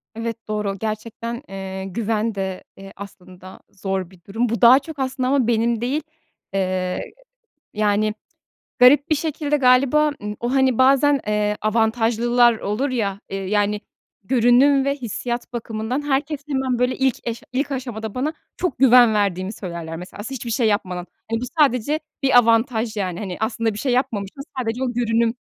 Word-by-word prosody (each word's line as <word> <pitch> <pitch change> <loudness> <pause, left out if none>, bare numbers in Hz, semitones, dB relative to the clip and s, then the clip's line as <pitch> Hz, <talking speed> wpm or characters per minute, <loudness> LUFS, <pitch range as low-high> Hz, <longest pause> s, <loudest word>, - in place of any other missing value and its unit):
Evet, 230 0 -5
doğru. 210 -2 -2
Gerçekten, 230 +2 -4
eee, 190 0 -6
güven 220 +2 -1
de, 190 -1 -4
eee, 195 0 -11
aslında 185 -1 -12
zor 190 -2 -3
bir 185 -2 -18
durum. 225 +4 -1
Bu 235 - -2
daha 245 +3 +8
çok, 285 0 -10
aslında, 260 -1 -1
ama 270 -4 +2
benim 230 0 +1
değil, 265 +6 -1 0.5
eee, 185 -1 -1 0.7
yani, 210 0 +1 0.7
garip 275 +3 +6
bir 310 - +3
şekilde 295 -1 -1
galiba, 275 +3 +4
ııı, 210 0 -4
o, 240 +2 -2
hani, 265 -3 +3
bazen, 275 +2 +4
eee, 210 0 0
avantajlılar 230 +2 +2
olur 220 +8 -1
ya, 205 -6 -2
ııı, 195 - -2
yani, 205 +1 +1 0.4
görünüm 260 +4 +4
ve 280 - +1
hissiyat 240 -1 -4
bakımından 230 +3 -3
herkes 290 +1 -1
hemen, 265 -3 -1
böyle, 250 +1 +1
ilk 265 -2 +2
eş 235 0 -4
ilk 275 +3 -1
aşamada 230 -5 -5
bana 285 +5 -1 0.2
çok 360 - -2
güven 245 -3 +7
verdiğimi 195 -1 0
söylerler 170 -5 -6
mesela 180 +4 -9
s 270 - -6
hiçbir 235 -1 -5
şey 230 0 +2
yapmadan. 185 -4 -1 0.2
Hani, 230 0 -1
bu - - -2
sadece 290 +1 +3 0.2
bir 265 -2 +5
avantaj 230 -1 +2
yani. 185 -3 -2
Hani, 190 -4 -5
aslında 220 0 -1
bir 205 - -6
şey 260 - 0
yapmamışım 210 -5 -1
ama 275 -2 -6
sadece 230 +3 -2
o 255 - -1
görünüm 230 -1 +1
230 Hz, 165 wpm, -21 LUFS, 205-255 Hz, 0.7 s, daha